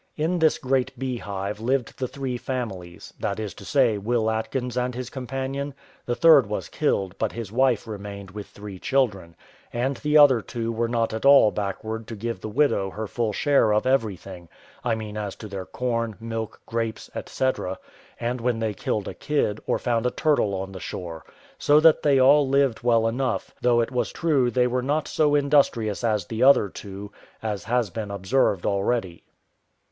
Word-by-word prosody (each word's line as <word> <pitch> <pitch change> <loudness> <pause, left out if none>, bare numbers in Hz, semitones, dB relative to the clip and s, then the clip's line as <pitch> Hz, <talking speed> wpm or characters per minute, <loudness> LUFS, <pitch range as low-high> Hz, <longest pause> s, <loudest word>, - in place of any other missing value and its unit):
In 165 +3 0
this 160 -1 +3
great 130 -1 -1
bee 130 -2 -3
hive 100 0 -4
lived 125 +2 -1
the 130 - -1
three 135 -1 -4
families, 110 -9 -5
that 100 +1 -2
is 105 -2 -4
to - - -12
say, 125 -7 +2
Will 110 +1 0
Atkins 120 +3 -3
and 125 0 -1
his 130 +1 -5
companion; 135 +2 -4 0.3
the 120 - 0
third 150 -6 +6
was 100 -5 -4
killed, 95 -1 0
but - - -1
his 115 -4 -6
wife 125 -1 +2
remained 100 -3 -7
with 105 +1 -7
three 100 -2 -10
children, 100 -12 0 0.4
and 130 +3 -1
the 150 0 +2
other 135 -6 +7
two 115 +1 -4
were 115 +1 -1
not 115 -1 0
at 110 - -4
all 140 -6 +7
backward 110 +2 -4
to 115 - -6
give 115 -2 -4
the 110 - -5
widow 105 -5 +2
her 110 +3 -5
full 115 +1 -1
share 135 0 +3
of 105 +3 +2
everything, 100 -9 -1 0.3
I 120 -3 +1
mean 110 -1 -6
as 105 -2 -4
to 110 - -9
their 95 -2 -6
corn, 115 -3 -2
milk, 115 -1 -5
grapes, 115 -1 -3 0.2
&c., 130 - 0 0.7
and 120 +1 -2
when 120 -1 0
they 110 -2 -1
killed 105 0 -2
a - - -5
kid, 140 -8 -1
or - - +2
found 120 -1 0
a - - +2
turtle 130 -8 +1
on 95 0 -4
the 95 - -8
shore; 85 -2 -7 0.3
so 145 +1 +5
that 160 0 +5
they 140 -2 +4
all 140 +1 +5
lived 135 -3 +2
well 115 -2 +3
enough; 125 +3 -2
though 120 -1 +4
it 115 - -2
was 125 -3 -1
true 145 -7 +1
they 125 0 +2
were 125 +1 0
not 145 +4 -1
so 150 -2 +2
industrious 140 -7 +2
as 105 -5 +1
the 110 +4 -5
other 130 -6 +6
two, 100 +2 -9 0.3
as 105 -4 -3
has 120 -2 0
been 110 -2 -5
observed 100 0 +1
already. 100 -3 -1
115 Hz, 190 wpm, -24 LUFS, 105-130 Hz, 0.7 s, other